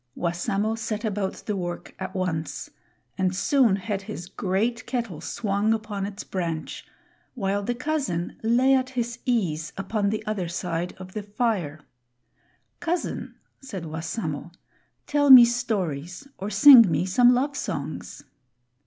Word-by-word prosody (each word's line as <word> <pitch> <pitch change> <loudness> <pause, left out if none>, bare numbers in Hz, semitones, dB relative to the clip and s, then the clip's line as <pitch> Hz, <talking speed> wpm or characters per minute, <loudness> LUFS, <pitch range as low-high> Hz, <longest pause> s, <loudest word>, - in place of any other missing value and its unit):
Wassamo 195 +5 -1
set 225 0 -4
about 205 -2 -1
the 210 - -1
work 175 -2 -5
at 190 +1 -6
once 170 -4 -3 0.5
and 185 -1 +1
soon 245 0 +3
had 200 0 -3
his 180 -2 -8
great 215 +6 -1
kettle 230 - -3
swung 210 +1 0
upon 210 -3 -4
its 200 0 -7
branch, 165 -4 -4 0.5
while 200 -3 -1
the 240 +4 -2
cousin 255 - -2
lay 245 +4 +3
at 260 -1 +2
his 240 -2 -3
ease 170 -10 0
upon 200 +1 -1
the 215 +1 -3
other 205 -5 -2
side 175 0 -3
of 185 0 -10
the 215 - -3
fire. 205 -8 -2 1.0
"Cousin," 350 0 -3 0.3
Said 200 -10 -7
Wassamo, 160 0 -4 0.5
"tell 290 -1 +2
me 255 -3 +12
stories 200 - -2
or 195 - -3
sing 230 0 +9
me 170 - +1
some 245 +6 +5
love 280 +3 0
songs." 150 - -5
205 Hz, 135 wpm, -25 LUFS, 180-235 Hz, 1.0 s, me